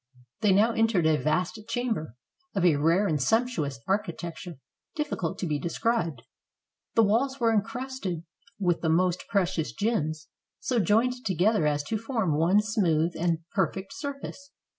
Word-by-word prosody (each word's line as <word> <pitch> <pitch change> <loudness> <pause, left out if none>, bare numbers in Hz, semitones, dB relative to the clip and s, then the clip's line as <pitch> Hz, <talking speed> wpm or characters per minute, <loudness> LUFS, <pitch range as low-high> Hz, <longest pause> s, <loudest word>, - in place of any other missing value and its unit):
They 210 - +3
now 210 +5 +4
entered 225 -7 +2
a 160 -1 +4
vast 180 +7 0
chamber, 225 - -2 0.4
of 190 -2 +2
a 160 -5 +5
rare 165 +7 +3
and 155 -7 0
sumptuous 165 - 0
architecture 175 -3 -3 0.4
difficult 290 - -2
to - - -3
be 150 -3 -1
described. 170 - -1 0.7
The 225 - +6
walls 260 +6 +1
were 230 -2 +3
incrusted 225 -5 -2 0.3
with 175 -4 +1
the 160 - 0
most 180 +2 +2
precious 180 -6 0
gems, 155 -8 -1 0.3
so 250 -2 0
joined 235 +6 +2
together 190 -2 +2
as 145 -1 0
to 220 +8 -2
form 225 - -1
one 175 +7 +4
smooth 175 -7 +1
and 165 -1 -1
perfect 190 -1 -1
sur 280 -1 -5
face. 280 0 -9
190 Hz, 150 wpm, -27 LUFS, 165-225 Hz, 0.7 s, The